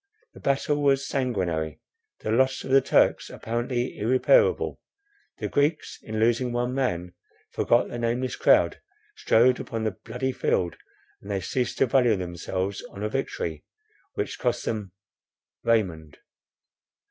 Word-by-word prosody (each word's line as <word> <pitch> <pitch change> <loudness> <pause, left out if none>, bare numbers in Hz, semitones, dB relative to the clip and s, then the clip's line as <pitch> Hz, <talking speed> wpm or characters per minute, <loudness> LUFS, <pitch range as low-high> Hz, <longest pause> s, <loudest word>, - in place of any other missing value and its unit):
The - - -13
battle 145 +2 0
was 135 -1 +2
sanguinary, 90 - -1 0.4
the 110 - -2
loss 130 +3 +2
of 130 - -6
the 135 0 +6
Turks - - +2
apparently 120 +2 -3
irreparable; 440 - +3 0.6
the - - -3
Greeks, 150 +2 0
in 110 0 -4
losing 120 +2 +2
one 120 +1 -1
man, 90 -10 -1 0.4
forgot - - +2
the 120 - -6
nameless 120 +2 -1
crowd - - +3 0.3
strewed 125 +3 +3
upon 115 -3 -4
the 110 - 0
bloody 130 +7 -4
field, 85 -8 0 0.5
and 100 - -12
they 100 -1 0
ceased 125 +6 -2
to - - +4
value 125 -3 +3
themselves 95 +2 -3
on 100 - -8
a 105 - 0
victory, 95 - -3 0.5
which - - -3
cost - - -1
them— 105 -4 -3 0.7
Raymond. 85 -10 0
120 Hz, 135 wpm, -26 LUFS, 100-130 Hz, 0.7 s, the